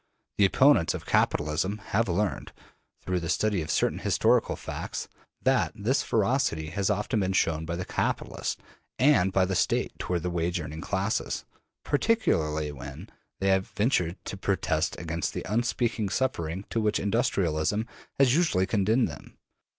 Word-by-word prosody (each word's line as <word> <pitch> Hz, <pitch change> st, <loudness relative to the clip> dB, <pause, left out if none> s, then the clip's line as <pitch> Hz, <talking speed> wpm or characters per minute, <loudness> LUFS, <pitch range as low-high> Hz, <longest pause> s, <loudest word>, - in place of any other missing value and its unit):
The 100 Hz, -, +7 dB
opponents 100 Hz, -, +4 dB
of -, -, -7 dB
capitalism 75 Hz, +7 st, +1 dB
have 110 Hz, +1 st, -1 dB
learned, 95 Hz, +3 st, -1 dB, 0.5 s
through 90 Hz, -1 st, -1 dB
the 85 Hz, -1 st, -5 dB
study 100 Hz, +1 st, +1 dB
of 80 Hz, -, -6 dB
certain -, -, +1 dB
historical -, -, +2 dB
facts, -, -, -5 dB, 0.4 s
that -, -, +2 dB
this 120 Hz, +8 st, +1 dB
ferocity 105 Hz, -, 0 dB
has 100 Hz, +2 st, 0 dB
often 105 Hz, +3 st, 0 dB
been 95 Hz, -1 st, 0 dB
shown 80 Hz, -3 st, +1 dB
by 85 Hz, -, -2 dB
the 90 Hz, +1 st, -4 dB
capitalists -, -, -2 dB, 0.4 s
and 125 Hz, -9 st, +4 dB
by 95 Hz, -1 st, +3 dB
the 95 Hz, -, -2 dB
State -, -, +1 dB
toward 90 Hz, -2 st, -2 dB
the 90 Hz, -, -1 dB
wage 85 Hz, 0 st, -1 dB
earning 80 Hz, 0 st, -6 dB
classes, 100 Hz, +3 st, -2 dB, 0.4 s
particularly 80 Hz, -, +1 dB
when 75 Hz, -, -9 dB, 0.3 s
they 95 Hz, -, +1 dB
have 95 Hz, 0 st, +2 dB
ventured 95 Hz, -7 st, +1 dB
to 100 Hz, -, -5 dB
protest 90 Hz, -5 st, 0 dB
against 85 Hz, -1 st, -3 dB
the -, -, -4 dB
unspeakable 115 Hz, -1 st, 0 dB
suffering 95 Hz, -7 st, -2 dB
to 115 Hz, -, 0 dB
which 105 Hz, -1 st, +1 dB
industrialism 100 Hz, -3 st, 0 dB, 0.3 s
has 135 Hz, -3 st, +5 dB
usually 155 Hz, -, +2 dB
condemned 110 Hz, +5 st, +2 dB
them. 70 Hz, -2 st, -11 dB
95 Hz, 150 wpm, -27 LUFS, 85-110 Hz, 0.5 s, The